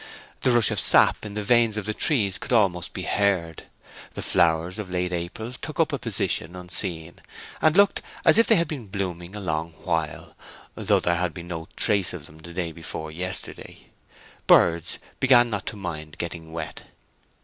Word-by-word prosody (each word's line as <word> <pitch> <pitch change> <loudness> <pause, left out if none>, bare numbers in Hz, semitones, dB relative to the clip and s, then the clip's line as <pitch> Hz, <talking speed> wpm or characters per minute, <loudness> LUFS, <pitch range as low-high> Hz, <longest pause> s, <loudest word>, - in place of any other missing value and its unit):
The - - +2
rush 120 -2 +4
of 110 - 0
sap - - +5
in 100 - -9
the 105 - -2
veins 115 0 +3
of 105 - -3
the 110 - -2
trees 105 - +2
could - - -7
almost 95 -7 +2
be - - -6
heard. 95 -6 0 0.5
The - - -4
flowers 85 +4 +1
of 105 -3 -6
late 90 0 -2
April 90 +7 -5
took - - -8
up - - +2
a - - -1
position 85 +3 0
unseen, 90 -2 -3 0.4
and 155 +3 +3
looked 200 0 +4 0.2
as - - +6
if 230 - +4
they 225 - +6
had 170 -3 +1
been 140 -8 -6
blooming 95 -1 -5
a - - -5
long 80 -3 -3
while, 80 -5 -3 0.4
though - - +1
there 85 0 0
had 90 -1 -1
been 85 -1 -9
no 80 -2 -6
trace 100 -4 +2
of 85 -5 -8
them 75 +1 -15
the 85 +2 -11
day 85 -1 -3
before 80 -1 -6
yesterday; 90 +3 -3 0.6
birds 85 -1 +4 0.2
began 120 -3 +5
not 100 -2 -4
to - - -3
mind 80 -6 -7
getting 80 -1 -6
wet. 85 - -6
90 Hz, 185 wpm, -24 LUFS, 85-105 Hz, 0.6 s, as